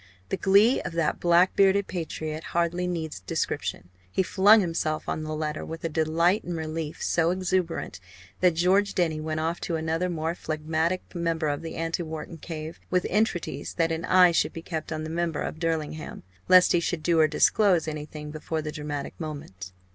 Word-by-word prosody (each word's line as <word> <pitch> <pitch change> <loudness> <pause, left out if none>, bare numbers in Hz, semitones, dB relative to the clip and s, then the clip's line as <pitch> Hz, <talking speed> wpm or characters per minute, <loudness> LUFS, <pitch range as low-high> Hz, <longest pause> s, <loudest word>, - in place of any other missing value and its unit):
The 195 - -1
glee 200 +7 +4
of 175 - -5
that 165 -2 0
black 175 +1 +4
bearded 195 0 +4
patriot 160 -3 -5
hardly 175 +1 +1
needs 160 - -3
description. 90 -1 -3 0.2
He 190 - +1
flung 205 +4 +6
himself 165 -4 -1
on - - -2
the 155 0 -4
letter 155 0 -3
with 165 0 -7
a 165 - -1
delight 165 +5 +2
and 175 -1 -4
relief 160 -1 -4
so 165 -1 +2
exuberant 180 - -1 0.4
that 180 -2 +3
George 195 +4 +2
Denny 160 -4 +1
went 155 0 -2
off 165 +2 -2
to 170 - -2
another 165 +3 -1
more 165 -1 -2
phlegmatic 160 +2 -2
member 165 -3 -1
of 145 +1 -2
the 165 - -6
anti 165 +1 -2
Wharton 160 0 -6
"cave," 160 0 -7
with 180 -1 +1
entreaties 210 -3 -1
that 165 -1 +1
an 165 0 -2
eye 180 -1 +6
should 165 - +1
be 165 - -7
kept 160 -2 -5
on 155 -1 -3
the 155 - -5
member 165 -2 -1
for 160 - -6
Derlingham, 160 -2 -3 0.2
lest 185 0 +7
he 175 - +4
should 170 -1 -2
do 170 -2 +3
or 155 - +6
disclose 175 +2 +3
anything 150 0 -6
before 155 +1 -4
the 150 - -4
dramatic 150 -2 -5
moment. 140 - -7
165 Hz, 185 wpm, -26 LUFS, 155-175 Hz, 0.4 s, lest